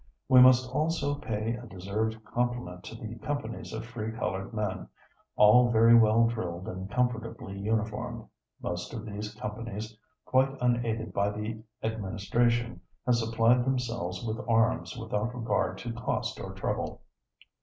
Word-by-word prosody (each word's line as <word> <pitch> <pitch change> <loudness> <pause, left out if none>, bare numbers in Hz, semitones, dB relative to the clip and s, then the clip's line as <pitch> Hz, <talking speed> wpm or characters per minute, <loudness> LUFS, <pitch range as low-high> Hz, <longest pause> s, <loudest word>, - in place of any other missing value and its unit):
"We 130 -1 +8
must 130 0 +7
also 150 0 0
pay 110 -5 -2
a 120 0 -7
deserved 110 +3 -3
compliment 120 -7 -2
to - - -8
the 115 0 -7
companies 130 -4 -4
of - - -5
free 115 -2 -4
colored 95 -3 -3
men, 105 -4 -3 0.5
all 120 +4 +7
very 115 0 +6
well 115 0 +6
drilled 95 -6 -3
and 95 +1 -5
comfortably 115 -5 -2
uniformed. 110 +1 -2 0.4
Most 90 +6 -4
of 115 -1 -6
these 105 0 -6
companies, 110 0 -5 0.3
quite 135 +1 +2
unaided 120 -2 0
by 100 +1 +2
the 105 +2 -4 0.2
administration, 110 +3 0 0.2
have 125 - +4
supplied 115 +2 +3
themselves 115 -8 -2
with 110 0 -3
arms 115 +1 +2
without 110 +1 -2
regard 115 -1 0
to 120 -1 -5
cost 115 - -2
or - - -6
trouble." - - -3
115 Hz, 140 wpm, -29 LUFS, 105-120 Hz, 0.5 s, We